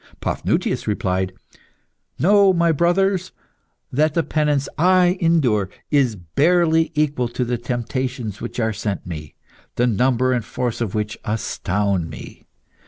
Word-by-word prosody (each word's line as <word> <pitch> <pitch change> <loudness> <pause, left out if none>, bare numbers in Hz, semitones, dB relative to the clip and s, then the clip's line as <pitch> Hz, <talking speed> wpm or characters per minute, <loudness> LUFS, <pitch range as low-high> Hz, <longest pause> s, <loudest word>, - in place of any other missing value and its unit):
Paphnutius - - -1
replied 95 -3 -1 0.9
"Know, 200 +2 +5
my 170 -1 +3
brothers, 185 +3 +1 0.6
that 150 +3 +1
the 165 - +2
penance 150 -3 0
I 180 +1 +4
endure 130 - +2 0.2
is 135 -6 +3
barely 160 - +2
equal 145 -5 +1
to 125 +1 -2
the 120 0 -2
temptations 120 -2 -3
which 120 - -5
are 110 -1 0
sent 100 -1 -4
me, 75 -4 -7 0.4
the 120 - +2
number 125 +2 +2
and 120 -2 0
force 120 +1 -3
of 110 -4 -2
which 105 0 -3
astound 100 -4 -1
me. - - -11
125 Hz, 130 wpm, -21 LUFS, 105-160 Hz, 0.9 s, Know